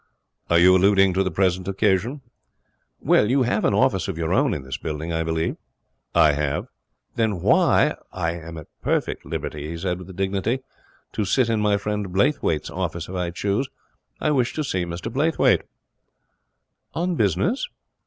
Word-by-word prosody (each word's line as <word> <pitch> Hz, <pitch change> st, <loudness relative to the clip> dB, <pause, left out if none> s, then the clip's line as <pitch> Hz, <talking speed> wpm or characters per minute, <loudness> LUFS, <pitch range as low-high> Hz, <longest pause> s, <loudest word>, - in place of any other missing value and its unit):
'Are 85 Hz, -, +4 dB
you 90 Hz, +2 st, +7 dB
alluding 95 Hz, 0 st, +4 dB
to 95 Hz, -, +1 dB
the 95 Hz, -, +1 dB
present 90 Hz, +1 st, 0 dB
occasion?' 100 Hz, +7 st, 0 dB, 0.8 s
'Well, 105 Hz, -, +3 dB
you 130 Hz, +1 st, +3 dB
have 110 Hz, -3 st, 0 dB
an 100 Hz, -, +2 dB
office 95 Hz, -1 st, +2 dB
of 95 Hz, -4 st, -4 dB
your 80 Hz, +1 st, -1 dB
own 140 Hz, +2 st, +3 dB
in 70 Hz, -, -5 dB
this 65 Hz, -1 st, -5 dB
building, 80 Hz, +1 st, -4 dB
I 80 Hz, -, 0 dB
believe.' 80 Hz, 0 st, -1 dB, 0.6 s
'I 75 Hz, -, +6 dB
have.' 70 Hz, -1 st, -2 dB, 0.5 s
'Then 110 Hz, -5 st, 0 dB
why -, -, +4 dB
' -, -, -44 dB
'I 85 Hz, -3 st, -1 dB
am 85 Hz, -1 st, -8 dB
at 80 Hz, -, -8 dB, 0.2 s
perfect -, -, -1 dB
liberty,' 75 Hz, 0 st, -5 dB
he 85 Hz, -, -5 dB
said, 90 Hz, +1 st, -2 dB
with 95 Hz, 0 st, -10 dB
dignity, 100 Hz, +6 st, -1 dB, 0.5 s
'to 105 Hz, -, -1 dB
sit 115 Hz, +5 st, +2 dB
in 115 Hz, -1 st, +1 dB
my 105 Hz, -1 st, +3 dB
friend 105 Hz, 0 st, -3 dB
Blaythwayt's 95 Hz, -, +1 dB
office 85 Hz, -2 st, -4 dB
if -, -, -7 dB
I 90 Hz, -2 st, -2 dB
choose. 100 Hz, +8 st, -1 dB, 0.5 s
I 150 Hz, -, +1 dB
wish 125 Hz, -4 st, +1 dB
to 155 Hz, -, -1 dB
see 95 Hz, -10 st, -1 dB
Mr 85 Hz, +7 st, -6 dB
Blaythwayt.' 155 Hz, +4 st, +3 dB, 1.3 s
'On 175 Hz, +2 st, 0 dB
business?' 110 Hz, -, 0 dB
95 Hz, 175 wpm, -23 LUFS, 85-110 Hz, 1.3 s, you